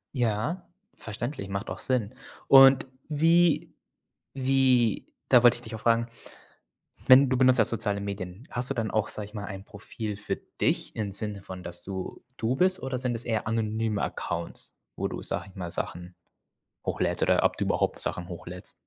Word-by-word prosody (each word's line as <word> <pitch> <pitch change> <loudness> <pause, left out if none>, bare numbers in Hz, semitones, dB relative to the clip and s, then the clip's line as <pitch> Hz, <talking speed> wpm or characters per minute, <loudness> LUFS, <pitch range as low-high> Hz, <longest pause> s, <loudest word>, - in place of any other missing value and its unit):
Ja, 120 - -1 0.3
verständlich, 110 0 -5
macht 100 +2 -4
auch - - -6
Sinn. 125 -2 -1 0.3
Und 135 -1 +8 0.2
wie 165 +2 +3 0.6
wie 130 -4 +2 0.2
da 125 - +6
wollte 120 0 +6
ich 120 - -10
dich 110 -1 -8
auch - - -10
fragen, 115 0 +2 1.0
wenn 130 +1 +8
du 130 - +2
benutzt 130 0 +6
ja 110 - +6
soziale 105 -2 +1
Medien, 100 +2 -6
hast 125 +1 -1
du - - 0
dann 115 -4 -2
auch, 110 -1 0
sage 105 - -4
ich 105 - -17
mal, 105 -2 -5
ein 95 -1 -7
Profil 105 +1 -6
für 105 - -3 0.2
dich - - 0
im 105 -2 -3
Sinne 100 0 -4
von, 95 -1 -9
dass 85 0 -7
du 95 -1 -6
du 115 +1 0
bist? 185 +4 +2
Oder 130 -1 -3
sind 125 -1 -1
es 115 - -4
eher 110 -3 -1
anonyme 110 -1 -1
Accounts, 85 0 -4 0.2
wo - - -1
du, - - -6
sage - - -2
ich 95 - -21
mal, 90 -3 -5
Sachen 90 +1 -4 0.7
hochlädst - - 0
oder - - +3
ob - - +2
du - - -1
überhaupt - - 0
Sachen 90 +1 -3
hochlädst? 90 +1 -8
110 Hz, 180 wpm, -27 LUFS, 100-130 Hz, 1.0 s, Und